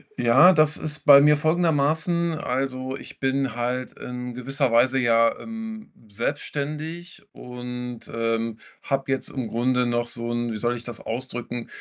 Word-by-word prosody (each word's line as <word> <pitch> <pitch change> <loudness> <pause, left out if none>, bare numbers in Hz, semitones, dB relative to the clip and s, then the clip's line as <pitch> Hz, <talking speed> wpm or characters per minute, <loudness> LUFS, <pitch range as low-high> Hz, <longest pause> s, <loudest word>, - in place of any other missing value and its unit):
Ja, 125 +10 +6
das 155 -2 +3
ist 155 -1 -4
bei 140 -1 +9
mir 150 +1 +5
folgendermaßen: 160 +1 +1
Also, 130 -1 -3
ich - - -12
bin 135 -2 0
halt 125 +1 -2
in 125 0 -7
gewisser 135 +1 -1
Weise 130 +3 +4
ja, 115 -1 +3
ähm, 225 -1 -8 0.2
selbstständig 150 - -4
und, 125 -1 -7
ähm, 115 -1 -1 0.3
habe 135 -1 -1
jetzt 135 - -1
im 130 -4 -4
Grunde 125 +2 +1
noch 120 0 0
so 120 0 -3
'n 120 0 -1
wie - - -4
soll 120 +2 0
ich 120 - -7
das 120 -3 -6
ausdrücken, 120 0 -4
130 Hz, 150 wpm, -24 LUFS, 120-150 Hz, 0.3 s, bei